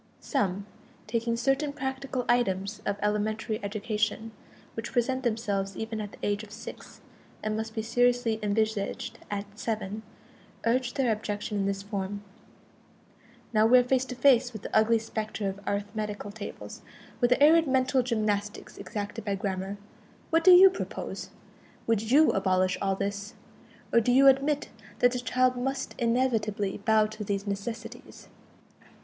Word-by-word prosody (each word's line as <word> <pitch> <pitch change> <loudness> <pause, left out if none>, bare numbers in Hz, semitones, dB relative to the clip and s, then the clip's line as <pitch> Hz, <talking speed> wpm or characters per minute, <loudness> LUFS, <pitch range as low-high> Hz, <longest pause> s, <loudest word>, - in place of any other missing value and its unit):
Some, 200 - -1 0.4
taking 230 0 -1
certain 270 +4 +1
practical 265 -2 -3
items 210 -3 0
of 200 0 0
elementary 215 +1 -1
education, 215 +1 -2 0.4
which 225 - -5
present 260 +1 0
themselves 205 -5 -1
even 220 -1 -4
at 205 -1 -7
the - - -12
age 205 0 0
of 215 - -12
six, 220 - -10 0.4
and 215 0 -1
must 220 +1 -4
be 220 - -2
seriously 245 -1 +2
envisaged 210 0 -1
at 200 -1 -3
seven, 215 -2 -3 0.6
urge 245 +1 +1
their 260 -4 +2
objection 210 0 -3
in 195 - 0
this 195 0 -2
form: 200 0 -4 1.3
Now 215 0 +5
we 250 +2 +7
are 250 - +5
face 255 +1 +1
to 255 - -6
face 250 -1 +4
with 215 - -8
the - - -5
ugly 220 +1 +5
specter 220 -2 -4
of 195 0 -4
arithmetical 205 0 -3
tables, 205 0 -8 0.4
the 245 +1 +3
arid 320 +2 +6
mental 260 0 +2
gymnastics 215 -4 -2
exacted 205 -3 -5
by 200 -2 -1
grammar. 195 0 -3 0.5
What 330 0 +3
do 370 - +7
you 370 +1 +9
propose? 370 - -5 0.6
Would 225 -1 0
you 300 +5 +6
abolish 185 -1 +1
all 195 -1 +1
this, 200 +1 -4 0.6
or 235 - +7
do 235 +2 +1
you 270 +2 +6
admit 280 +2 +4 0.3
that 245 - +4
the 250 - -2
child 255 +1 +2
must 265 +2 -2
inevitably 230 -5 0
bow 220 -1 +5
to 215 0 -6
these 200 0 -2
necessities? 200 +3 -6
220 Hz, 150 wpm, -28 LUFS, 205-250 Hz, 1.3 s, you